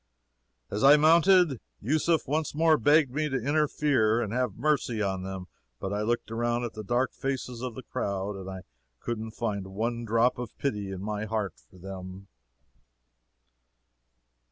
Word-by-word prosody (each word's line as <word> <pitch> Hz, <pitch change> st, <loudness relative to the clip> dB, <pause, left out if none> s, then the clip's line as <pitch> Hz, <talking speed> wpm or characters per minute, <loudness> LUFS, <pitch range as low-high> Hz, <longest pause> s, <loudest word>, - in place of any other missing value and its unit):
"As 105 Hz, -, -2 dB
I 140 Hz, +2 st, +9 dB
mounted, 165 Hz, -, +5 dB, 0.2 s
Yusef 155 Hz, +7 st, +1 dB
once 150 Hz, +2 st, -1 dB
more 160 Hz, 0 st, +5 dB
begged 145 Hz, +2 st, +4 dB
me 150 Hz, +3 st, -1 dB
to 135 Hz, -1 st, -1 dB
interfere 140 Hz, -4 st, +2 dB
and 110 Hz, -3 st, -2 dB
have 125 Hz, -5 st, 0 dB
mercy 130 Hz, -4 st, 0 dB
on 95 Hz, -3 st, -1 dB
them, 95 Hz, 0 st, -6 dB, 0.3 s
but 95 Hz, +1 st, -3 dB
I 105 Hz, -, -1 dB
looked 115 Hz, +1 st, -1 dB
around 120 Hz, +1 st, 0 dB
at 120 Hz, -, -4 dB
the 110 Hz, -, -7 dB
dark 120 Hz, +5 st, 0 dB
faces 125 Hz, -3 st, -4 dB
of 125 Hz, -3 st, -4 dB
the 130 Hz, -, -8 dB
crowd, 100 Hz, -1 st, -3 dB
and 95 Hz, -1 st, -7 dB
I 95 Hz, -1 st, -6 dB, 0.4 s
couldn't 110 Hz, -1 st, -5 dB
find 100 Hz, -4 st, -2 dB
one 115 Hz, +5 st, -2 dB
drop 115 Hz, +2 st, +2 dB
of 125 Hz, -3 st, -7 dB
pity 105 Hz, -8 st, -2 dB
in 95 Hz, 0 st, -6 dB
my 105 Hz, 0 st, -3 dB
heart 105 Hz, -5 st, -2 dB, 0.2 s
for -, -, -18 dB
them." 95 Hz, +1 st, -8 dB
115 Hz, 160 wpm, -28 LUFS, 100-135 Hz, 0.4 s, I